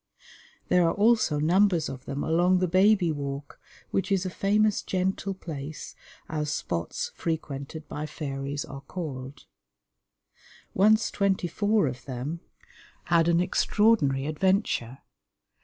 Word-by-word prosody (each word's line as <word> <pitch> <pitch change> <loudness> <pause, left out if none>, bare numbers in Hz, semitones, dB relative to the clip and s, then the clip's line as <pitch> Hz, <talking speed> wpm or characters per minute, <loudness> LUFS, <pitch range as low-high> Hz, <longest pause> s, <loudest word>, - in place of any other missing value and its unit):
There 180 -2 +4
are 165 - 0
also 215 -7 +3
numbers 175 +1 +3
of 130 -1 -8
them 140 +1 -3
along 175 +3 +3
the 185 0 +1
Baby 185 0 +4
Walk, 140 -1 -5 0.3
which 195 +1 -1
is 190 -1 +1
a 185 - -3
famous 210 +2 +2
gentle 190 +1 -2
place, 155 -4 -7 0.3
as 150 -1 -2
spots 85 - -3
frequented 155 -1 -4
by 150 +1 -5
fairies 140 -1 -4
are 135 0 -9
called. 140 -4 -7 1.3
Once 215 +3 +4
twenty 195 -3 +1
four 205 +2 +1
of 130 -2 -5
them 135 +5 -4 0.7
had 165 -1 +5
an 170 0 +3
extraordinary 180 -8 +2
adventure. 155 - 0
165 Hz, 125 wpm, -27 LUFS, 140-190 Hz, 1.3 s, had